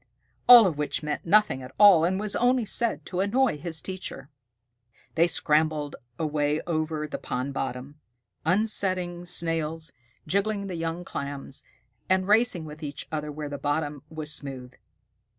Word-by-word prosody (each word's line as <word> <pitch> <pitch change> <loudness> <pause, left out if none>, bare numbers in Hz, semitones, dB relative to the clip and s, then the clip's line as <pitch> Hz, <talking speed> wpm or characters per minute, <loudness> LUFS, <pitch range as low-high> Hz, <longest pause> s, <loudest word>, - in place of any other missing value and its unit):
All 240 -3 +11
of 160 -6 -1
which 150 +1 -1
meant 150 +2 -4
nothing 210 -8 +4
at 130 +1 -11
all 200 -6 +8
and 190 +2 0
was 210 -1 -2
only 245 -1 +2
said 215 -9 -1
to 180 - -4
annoy 205 - +2
his 165 -1 -3
teacher. 185 -7 -6 0.8
They 165 +1 +4
scrambled 150 -2 +1 0.2
away 150 -1 0
over 155 -2 -2
the - - -5
pond 130 +3 -3
bottom, 135 +2 -5 0.4
upsetting 185 -2 0
Snails, 165 -2 -2 0.3
jiggling 200 +1 0
the 190 - -5
young 165 +1 -3
Clams, 140 -2 -5 0.5
and 185 0 +2
racing 210 -5 +3
with 150 0 -10
each 145 -2 -6
other 150 -1 -3
where 150 0 -5
the 145 -1 -6
bottom 145 -1 -2
was 155 -1 -4
smooth. 130 -3 -6
160 Hz, 150 wpm, -26 LUFS, 150-190 Hz, 0.8 s, All